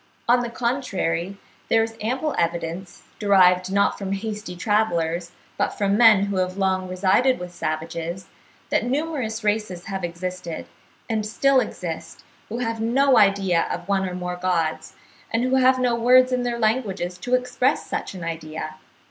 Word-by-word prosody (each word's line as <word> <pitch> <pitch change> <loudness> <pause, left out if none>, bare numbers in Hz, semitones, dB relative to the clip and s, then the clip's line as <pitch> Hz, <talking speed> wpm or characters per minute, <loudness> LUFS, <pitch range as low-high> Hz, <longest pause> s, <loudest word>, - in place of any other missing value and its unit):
On 245 +1 +5
the 240 -1 -3
contrary 200 -8 -2 0.3
there 225 - +4
is 225 0 -5
ample 260 +8 -1
evidence, 170 +2 -3 0.2
derived 185 -3 +4
not 200 +1 +2
from 195 -1 -3
hasty 210 -2 -5
travellers, 175 -4 0 0.3
but - - 0
from 200 -1 +1
men 215 -3 +6
who 200 -1 -2
have 185 0 -1
long 190 -1 0
resided 190 +8 +2
with 180 0 -8
savages, 165 +2 -4 0.5
that - - +2
numerous 255 -4 -2
races 210 -4 -1
have 195 -1 -4
existed, 175 0 -5 0.4
and 220 -2 -1
still 265 +5 +3
exist, 175 -8 -5 0.3
who 225 - -4
have 230 -2 -2
no 260 +4 +3
idea 195 -4 +3
of 175 +1 -5
one 190 -1 +1
or 180 - -6
more 180 0 -4
gods, 175 -3 -1 0.4
and 230 +1 +1
who 255 +1 +2
have 260 0 +5
no 250 -1 +1
words 255 +2 +5
in 250 0 +1
their 240 -1 -2
languages 205 -6 -1
to 245 +6 +1
express 250 +2 0
such - - -4
an 180 - -7
idea. 155 -1 -5
200 Hz, 160 wpm, -23 LUFS, 180-235 Hz, 0.5 s, men